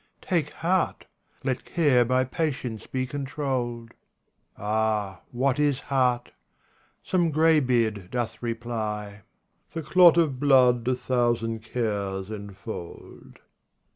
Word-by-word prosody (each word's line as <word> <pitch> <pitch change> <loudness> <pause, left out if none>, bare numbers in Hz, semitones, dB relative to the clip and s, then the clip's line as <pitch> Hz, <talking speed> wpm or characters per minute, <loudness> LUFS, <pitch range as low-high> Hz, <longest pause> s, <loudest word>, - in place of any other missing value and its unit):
Take 165 -6 0 0.2
heart! 185 +2 +1 0.4
let 130 -1 -1
care 145 -8 +3
by 130 +2 +2
patience 130 -5 -3
be 130 -1 -2
controlled." 130 -4 -3 0.7
Ah, 105 -2 -1
what 130 +2 0
is 145 -3 +2
heart? 125 -4 0 0.7
Some 175 -3 +1
greybeard 125 - +2
doth 120 -2 -3
reply: 110 -3 -4 0.2
" - - -40
The 165 - -3
clot 175 +2 +6
of 150 -6 +2
blood 125 -4 +4
a 130 - +2
thousand 120 -3 0
cares 100 -4 -3
enfold." 100 -3 -9
125 Hz, 105 wpm, -26 LUFS, 110-140 Hz, 0.7 s, clot